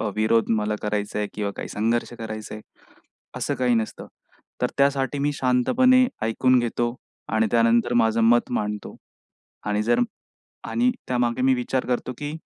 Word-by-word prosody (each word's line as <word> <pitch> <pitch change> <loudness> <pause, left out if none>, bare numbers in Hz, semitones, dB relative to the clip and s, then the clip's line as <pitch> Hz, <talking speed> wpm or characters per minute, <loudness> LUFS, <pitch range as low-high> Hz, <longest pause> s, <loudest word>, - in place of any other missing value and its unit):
अ, 110 - -1
विरोध 110 +1 +2
मला 105 0 -1
करायचा 105 0 -2
आहे 105 -1 -1
किंवा 105 -1 -2
काही - - -5
संघर्ष 115 +3 -1
करायचा 110 -1 -6
आहे. 110 - -9 0.8
असं - - -2
काही 125 -1 +1
नसतं 110 -1 -3 0.5
तर - - +3
त्यासाठी 140 0 +1
मी 145 +1 +1
शांतपणे 250 - +3 0.2
ऐकून 125 +3 +3
घेतो 120 0 -1 0.4
आणि 110 0 +3
त्यानंतर 115 +1 +3
माझं 115 -1 +3
मत 120 +1 +3
मांडतो 105 -3 -3 0.7
आणि 105 0 0
जर 120 +2 +2 0.7
आणि 245 +1 +2 0.2
त्यामागे 120 -1 0
मी 130 +1 +4
विचार 125 +1 -1
करतो 125 0 -2
की 145 0 -4
120 Hz, 155 wpm, -24 LUFS, 110-130 Hz, 0.8 s, मी